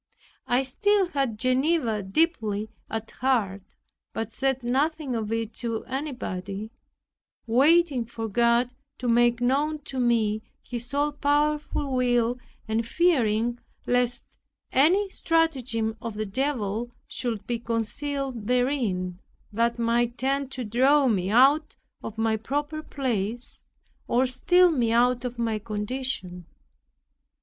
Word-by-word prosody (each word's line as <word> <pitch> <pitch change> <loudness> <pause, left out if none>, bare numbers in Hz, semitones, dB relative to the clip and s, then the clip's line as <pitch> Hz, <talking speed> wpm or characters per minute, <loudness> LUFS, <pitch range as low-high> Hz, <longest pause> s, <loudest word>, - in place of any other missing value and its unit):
I 245 +2 +2
still 395 +8 +2
had 270 -8 -1
Geneva 255 -2 +1
deeply 215 - 0 0.2
at 225 0 -4
heart; 225 -7 0 0.5
but 225 -2 -4
said 265 -2 0
nothing 275 +2 0
of 220 -1 -3
it 225 -1 -2
to 230 -2 -3
anybody, 220 -7 -4 0.7
waiting 275 +2 +4
for 225 -1 -5
God 235 +3 +2 0.2
to 250 - -4
make 240 0 +3
known 285 +5 +1
to 265 -2 -5
me 225 -3 +2 0.2
His 240 -1 -5
all 290 +1 +2
powerful 290 -1 0
will 245 -1 +2 0.3
and 220 +1 0
fearing 240 -6 +2 0.3
lest 245 0 +1 0.5
any 355 +10 +4
stratagem 260 - 0
of 230 -2 -5
the 215 +1 -2
Devil 240 -1 -2
should 225 -5 -4
be 235 -1 -2
concealed 235 +1 -3
therein, 235 -9 0 0.3
that 235 +2 +1
might 235 +1 +1
tend 275 +1 0
to 255 - -3
draw 265 +6 +4
me 195 -5 +1
out 275 +7 +4 0.3
of 225 - -7
my 225 0 +1
proper 290 +7 -3
place, 240 -5 -3 0.5
or 250 +2 +3
steal 350 +8 +4
me 240 -7 +1
out 245 +1 +3
of 245 0 -4
my 225 -2 -1
condition. 210 -4 -3
245 Hz, 125 wpm, -26 LUFS, 225-275 Hz, 0.7 s, waiting